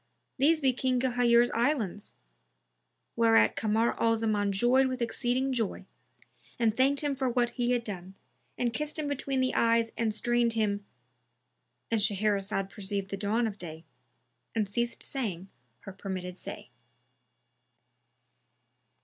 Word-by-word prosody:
these 310 Hz, +4 st, +4 dB
be 265 Hz, -2 st, +3 dB
King 255 Hz, 0 st, 0 dB
Ghayur's 240 Hz, -1 st, +3 dB
Islands;" 230 Hz, -, -1 dB, 1.0 s
whereat 225 Hz, -1 st, +4 dB
Kamar 225 Hz, +2 st, +1 dB
al 225 Hz, 0 st, +3 dB
Zaman 210 Hz, -2 st, 0 dB
joyed 245 Hz, +7 st, +3 dB
with 255 Hz, 0 st, -3 dB
exceeding 245 Hz, +3 st, 0 dB
joy 225 Hz, -5 st, -2 dB, 0.7 s
and 225 Hz, -3 st, +2 dB
thanked 275 Hz, +3 st, +2 dB
him 285 Hz, -1 st, 0 dB
for 265 Hz, -1 st, 0 dB
what 240 Hz, -1 st, +1 dB
he 240 Hz, 0 st, -1 dB
had 245 Hz, -1 st, +1 dB
done, 190 Hz, -3 st, -6 dB, 0.4 s
and 240 Hz, -2 st, 0 dB
kissed 300 Hz, +5 st, -2 dB
him 305 Hz, -2 st, -2 dB
between 275 Hz, -1 st, -1 dB
the 255 Hz, -, +1 dB
eyes 230 Hz, 0 st, +2 dB
and 225 Hz, -2 st, 0 dB
strained 240 Hz, +1 st, +1 dB
him—And 125 Hz, -, -5 dB
Shahrazad 200 Hz, -1 st, +1 dB
perceived 200 Hz, -1 st, -3 dB
the -, -, -1 dB
dawn 215 Hz, +4 st, 0 dB
of 205 Hz, -3 st, -4 dB
day 160 Hz, -1 st, -7 dB, 0.7 s
and 215 Hz, -2 st, +1 dB
ceased 235 Hz, +4 st, -2 dB
saying 195 Hz, -9 st, -3 dB, 0.3 s
her 195 Hz, -, -9 dB
permitted 185 Hz, -2 st, -5 dB
say. 125 Hz, -, -9 dB
225 Hz, 130 wpm, -29 LUFS, 200-245 Hz, 1.0 s, these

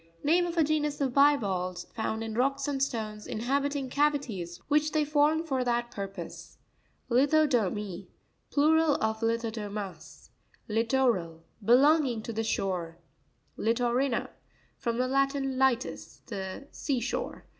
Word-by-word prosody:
Name 350 Hz, +4 st, +3 dB
of 345 Hz, 0 st, -5 dB
a 325 Hz, -, +5 dB
genus 300 Hz, -1 st, 0 dB
of 270 Hz, -3 st, 0 dB
bivalves 195 Hz, -11 st, +2 dB
found 220 Hz, 0 st, -2 dB
in 225 Hz, -1 st, -4 dB
rocks 275 Hz, +4 st, 0 dB
and 275 Hz, -2 st, -2 dB
stones, 215 Hz, -5 st, -2 dB
inhabiting 275 Hz, +4 st, -1 dB
cavities 255 Hz, -, -1 dB
which 300 Hz, +1 st, +2 dB
they 305 Hz, -1 st, +2 dB
form 300 Hz, +2 st, +3 dB
for 265 Hz, -6 st, -1 dB
that 240 Hz, -1 st, -1 dB
purpose. 195 Hz, -3 st, -7 dB, 0.5 s
Litxo'pomt.—Plural 275 Hz, -, +1 dB
of 220 Hz, 0 st, -1 dB
Lithodomus. 215 Hz, -4 st, -4 dB, 0.4 s
Li'troraL.—Belonging 230 Hz, -, +2 dB
to 230 Hz, -, -5 dB
the 225 Hz, +1 st, -1 dB
shore, 180 Hz, -6 st, -2 dB, 0.6 s
Lirrori'na.—From 235 Hz, 0 st, -2 dB
the 255 Hz, +1 st, +1 dB
Latin, 275 Hz, 0 st, 0 dB
litus, 265 Hz, -2 st, 0 dB
the 195 Hz, +4 st, -6 dB
sea 275 Hz, -4 st, -1 dB
shore. 240 Hz, -, -4 dB
245 Hz, 115 wpm, -29 LUFS, 215-285 Hz, 0.6 s, a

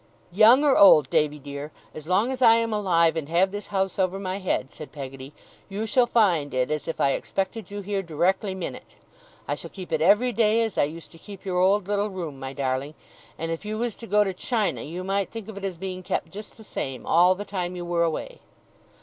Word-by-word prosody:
'Young 225 Hz, +9 st, +6 dB
or 285 Hz, -3 st, +4 dB
old, 155 Hz, -9 st, +7 dB
Davy 150 Hz, 0 st, +2 dB
dear, 145 Hz, +1 st, -7 dB, 0.2 s
as 155 Hz, 0 st, -9 dB
long 200 Hz, +8 st, +2 dB
as 260 Hz, 0 st, -5 dB
I 230 Hz, -2 st, +7 dB
am 230 Hz, -1 st, 0 dB
alive 170 Hz, -6 st, +2 dB
and 155 Hz, -2 st, -4 dB
have 180 Hz, +3 st, +3 dB
this 205 Hz, +1 st, -6 dB
house 195 Hz, -1 st, -1 dB
over 190 Hz, 0 st, +1 dB
my 190 Hz, -1 st, -3 dB
head,' 145 Hz, -8 st, -2 dB
said 155 Hz, -, -10 dB
Peggotty, 135 Hz, -1 st, -8 dB, 0.4 s
'you 205 Hz, +3 st, -3 dB
shall 240 Hz, +2 st, +3 dB
find 175 Hz, -, +2 dB
it 130 Hz, +3 st, 0 dB
as 150 Hz, -2 st, -3 dB
if 165 Hz, -, -4 dB
I 140 Hz, -, +3 dB
expected 195 Hz, +6 st, -3 dB
you 205 Hz, 0 st, -6 dB
here 200 Hz, 0 st, -2 dB
directly 190 Hz, +4 st, 0 dB
minute. 185 Hz, -, -7 dB, 0.5 s
I -, -, 0 dB
shall -, -, -7 dB
keep 185 Hz, -3 st, -9 dB
it 160 Hz, -1 st, 0 dB
every 210 Hz, +9 st, +4 dB
day, 225 Hz, 0 st, +3 dB
as 225 Hz, -3 st, -3 dB
I -, -, +3 dB
used 160 Hz, +3 st, -9 dB
to 165 Hz, -, -16 dB
keep 200 Hz, 0 st, -12 dB
your 180 Hz, -2 st, -1 dB
old 190 Hz, +1 st, +3 dB
little 205 Hz, +1 st, 0 dB
room, 170 Hz, -8 st, -6 dB
my 135 Hz, 0 st, -5 dB
darling; 135 Hz, +2 st, -3 dB, 0.4 s
and 165 Hz, 0 st, -3 dB
if 165 Hz, -, -4 dB
you 215 Hz, +1 st, -4 dB
was 235 Hz, -1 st, -2 dB
to 230 Hz, -, -10 dB
go 210 Hz, 0 st, +4 dB
to 195 Hz, -2 st, -3 dB
China, 215 Hz, +2 st, -1 dB
you 175 Hz, +4 st, -6 dB
might 195 Hz, +1 st, -1 dB
think 225 Hz, -3 st, -8 dB
of 220 Hz, -, -8 dB
it 200 Hz, -, -8 dB
as 190 Hz, -3 st, -3 dB
being 185 Hz, +1 st, -5 dB
kept 185 Hz, +1 st, -3 dB
just 210 Hz, +2 st, -10 dB
the 220 Hz, -, -13 dB
same, 135 Hz, -, -5 dB
all 180 Hz, +2 st, +5 dB
the 205 Hz, +2 st, -6 dB
time 180 Hz, -3 st, -4 dB
you 175 Hz, -1 st, -5 dB
were 175 Hz, -1 st, 0 dB
away. 165 Hz, -2 st, -3 dB
185 Hz, 235 wpm, -25 LUFS, 160-205 Hz, 0.5 s, old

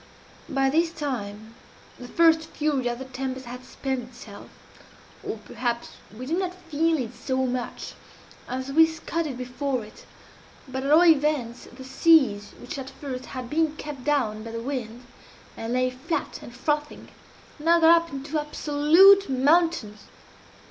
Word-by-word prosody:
"By 270 Hz, 0 st, +1 dB
this 330 Hz, +3 st, +2 dB
time 225 Hz, -8 st, -5 dB, 0.5 s
the 245 Hz, -, -8 dB
first 325 Hz, +3 st, +4 dB
fury 295 Hz, -5 st, -1 dB
of 240 Hz, 0 st, -2 dB
the 265 Hz, -, -7 dB
tempest 260 Hz, 0 st, -5 dB
had 250 Hz, +1 st, -8 dB
spent 260 Hz, -3 st, -4 dB
itself, 230 Hz, -4 st, -12 dB, 0.7 s
or -, -, -4 dB
perhaps 235 Hz, +2 st, -4 dB, 0.3 s
we 255 Hz, -, -6 dB
did 330 Hz, +7 st, -1 dB
not 365 Hz, -1 st, -3 dB
feel 330 Hz, -2 st, 0 dB
it 245 Hz, -5 st, -4 dB
so 260 Hz, -1 st, -1 dB
much 250 Hz, -1 st, -4 dB, 0.5 s
as 260 Hz, +2 st, -4 dB
we 320 Hz, +3 st, +6 dB
scudded 320 Hz, -3 st, -4 dB
before 250 Hz, -1 st, -3 dB
it; 215 Hz, -, -16 dB, 0.6 s
but 260 Hz, 0 st, -4 dB
at 275 Hz, -, -1 dB
all 330 Hz, +4 st, +7 dB
events 295 Hz, -7 st, +2 dB
the 260 Hz, +2 st, -11 dB
seas, 265 Hz, -6 st, +3 dB
which 245 Hz, +3 st, -7 dB
at 265 Hz, 0 st, -6 dB
first 260 Hz, -3 st, -7 dB
had 255 Hz, -2 st, -6 dB
been 315 Hz, +3 st, 0 dB
kept 290 Hz, -4 st, -7 dB
down 245 Hz, -8 st, 0 dB
by 230 Hz, -, -8 dB
the 230 Hz, 0 st, -5 dB
wind, 245 Hz, -1 st, -5 dB, 0.5 s
and 225 Hz, +1 st, -4 dB
lay 255 Hz, 0 st, +1 dB
flat 265 Hz, +7 st, -4 dB
and 240 Hz, -, -11 dB
frothing, 295 Hz, +3 st, -2 dB, 0.5 s
now 335 Hz, +3 st, +4 dB
got 330 Hz, +1 st, +7 dB
up -, -, -15 dB
into 280 Hz, +3 st, -3 dB
absolute 315 Hz, +7 st, +5 dB
mountains. 270 Hz, -5 st, +1 dB
270 Hz, 155 wpm, -25 LUFS, 245-315 Hz, 0.7 s, all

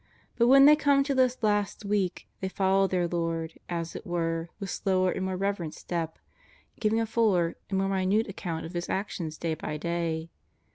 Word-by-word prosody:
But 235 Hz, 0 st, +3 dB
when 275 Hz, +2 st, +8 dB
they 300 Hz, +1 st, +9 dB
come 285 Hz, -2 st, +3 dB
to 280 Hz, 0 st, -1 dB
this 255 Hz, -2 st, +2 dB
last 205 Hz, 0 st, 0 dB
week 200 Hz, -3 st, -1 dB
they 190 Hz, -, -2 dB
follow 195 Hz, 0 st, +2 dB
their 180 Hz, -2 st, 0 dB
Lord, 165 Hz, -1 st, -3 dB
as 170 Hz, -1 st, -3 dB
it -, -, -6 dB
were, 165 Hz, -1 st, -2 dB
with 195 Hz, -3 st, -4 dB
slower 185 Hz, -2 st, +1 dB
and 190 Hz, -, -3 dB
more 190 Hz, -1 st, -2 dB
reverent 195 Hz, -5 st, -2 dB
step, 165 Hz, -2 st, -4 dB, 0.6 s
giving 220 Hz, 0 st, +2 dB
a 225 Hz, -, +1 dB
fuller 205 Hz, -7 st, +2 dB
and 195 Hz, -, 0 dB
more 195 Hz, 0 st, +1 dB
minute 195 Hz, +3 st, +1 dB
ac 195 Hz, -, -7 dB
count 165 Hz, -3 st, -4 dB
of 165 Hz, -, -8 dB
His 175 Hz, 0 st, -3 dB
actions 170 Hz, -5 st, -3 dB
day 165 Hz, -1 st, -1 dB
by 155 Hz, -1 st, -4 dB
day. 165 Hz, 0 st, -2 dB
190 Hz, 195 wpm, -28 LUFS, 170-210 Hz, 0.6 s, they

